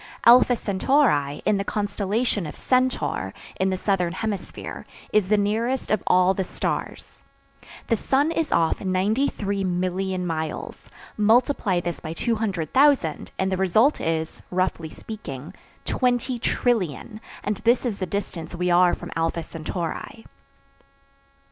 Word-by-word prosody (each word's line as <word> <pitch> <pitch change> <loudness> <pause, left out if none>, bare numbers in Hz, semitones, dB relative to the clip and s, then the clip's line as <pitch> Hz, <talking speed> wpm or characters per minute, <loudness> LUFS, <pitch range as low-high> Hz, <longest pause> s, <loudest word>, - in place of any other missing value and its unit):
Alpha 245 +1 +7
Centauri, 200 - +1
in 210 - +3
the 195 - -1
constellation 205 0 -1
of - - -8
Centaur, 250 - 0 0.2
in 190 +1 +2
the 185 - -1
Southern 180 -3 0
Hemisphere, 205 -1 -5 0.3
is 215 -3 +3
the 210 - +4
nearest 225 +6 0
of 215 - +2
all 185 +1 +5
the 190 - -1
stars. - - -4 0.6
The 230 - +2
sun 280 +7 +1
is 330 -2 -1
off 165 -1 +2
93,000,000 190 -3 -1
miles; 160 -2 -4 0.3
multiply 220 -3 +3
this 175 0 -4
by 160 0 -6
200,000, 220 - +1
and 190 0 0
the 190 - 0
result 215 - +3
is, 160 0 -2
roughly 180 -3 -1
speaking, 155 - -8 0.3
20,000,000,000,000; 240 - 0 0.2
and 210 -1 -1
this 235 +4 +2
is 220 -5 -2
the 185 - -2
distance 175 -3 -4
we 180 +1 0
are 175 0 +5
from - - -9
Alpha 165 0 -1
Centauri. 170 - -5
195 Hz, 125 wpm, -24 LUFS, 175-230 Hz, 0.6 s, Alpha